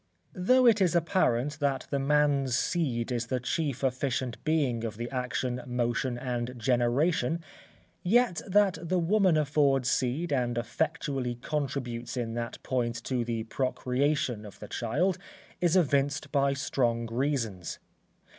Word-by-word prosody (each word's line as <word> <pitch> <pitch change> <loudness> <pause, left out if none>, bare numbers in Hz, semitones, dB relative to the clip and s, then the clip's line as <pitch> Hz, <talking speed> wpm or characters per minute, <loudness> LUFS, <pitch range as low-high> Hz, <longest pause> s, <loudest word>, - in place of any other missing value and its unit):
Though 255 +8 +4
it 225 -4 +5
is 180 -2 +3
apparent 150 -5 +1
that 140 -3 0
the 140 - +1
man's 140 -2 +2
seed 130 -10 -1
is 120 -1 -1
the 130 0 -1
chief 140 +1 -2
efficient 130 -1 -1
being 140 -8 +1
of 110 -2 -4
the 120 +1 -3
action, 125 -1 -2
motion, 120 0 -1
and 125 0 -3
generation: 125 +6 +1 0.6
yet 225 -1 +3
that 195 -3 +3
the 180 +2 0
woman 185 -1 +3
affords 140 -4 +2
seed 140 +7 0
and 120 -3 0
effectually 135 0 -2
contributes 125 -3 -3
in 115 -2 -2
that 120 0 -4
point 120 -2 -1
to 125 -2 -1
the 115 -1 -2
procreation 130 0 -1
of 105 - -11
the - - -9
child, 155 +11 0 0.4
is 175 0 +2
evinced 140 -5 +1
by 140 -1 +2
strong 120 -4 0
reasons. 115 - -2
130 Hz, 135 wpm, -29 LUFS, 120-155 Hz, 0.6 s, it